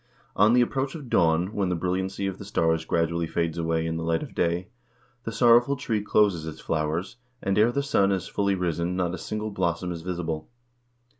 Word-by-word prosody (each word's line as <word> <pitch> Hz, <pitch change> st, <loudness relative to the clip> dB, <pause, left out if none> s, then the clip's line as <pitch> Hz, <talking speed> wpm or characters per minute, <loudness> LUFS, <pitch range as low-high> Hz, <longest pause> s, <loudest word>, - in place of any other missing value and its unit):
On 105 Hz, +3 st, +5 dB
the 125 Hz, -, +5 dB
approach 135 Hz, +3 st, -1 dB
of 140 Hz, -7 st, -9 dB
dawn, 85 Hz, +4 st, +2 dB
when 100 Hz, -3 st, 0 dB
the 90 Hz, -, 0 dB
brilliancy 95 Hz, +3 st, -2 dB
of 95 Hz, -1 st, -3 dB
the -, -, -7 dB
stars 80 Hz, -5 st, 0 dB
gradually 85 Hz, 0 st, 0 dB
fades 85 Hz, 0 st, -1 dB
away 80 Hz, 0 st, 0 dB
in 80 Hz, 0 st, -2 dB
the 80 Hz, -, -3 dB
light 80 Hz, 0 st, 0 dB
of -, -, -9 dB
day, 85 Hz, +2 st, 0 dB, 0.6 s
the 115 Hz, -, -3 dB
Sorrowful 120 Hz, +4 st, +5 dB
Tree 115 Hz, -6 st, -1 dB
closes 100 Hz, -6 st, +2 dB
its 80 Hz, -, -7 dB
flowers, 80 Hz, +8 st, -2 dB, 0.2 s
and 95 Hz, -3 st, -1 dB
ere 110 Hz, +3 st, +4 dB
the 140 Hz, +3 st, -1 dB
sun 100 Hz, -8 st, +2 dB
is 95 Hz, -2 st, -1 dB
fully 100 Hz, -1 st, 0 dB
risen 85 Hz, -1 st, -1 dB
not 90 Hz, -1 st, -1 dB
a -, -, -5 dB
single 110 Hz, 0 st, -4 dB
blossom 90 Hz, -2 st, -1 dB
is 85 Hz, -2 st, -5 dB
visible. 85 Hz, -3 st, -4 dB
90 Hz, 205 wpm, -26 LUFS, 85-105 Hz, 0.6 s, On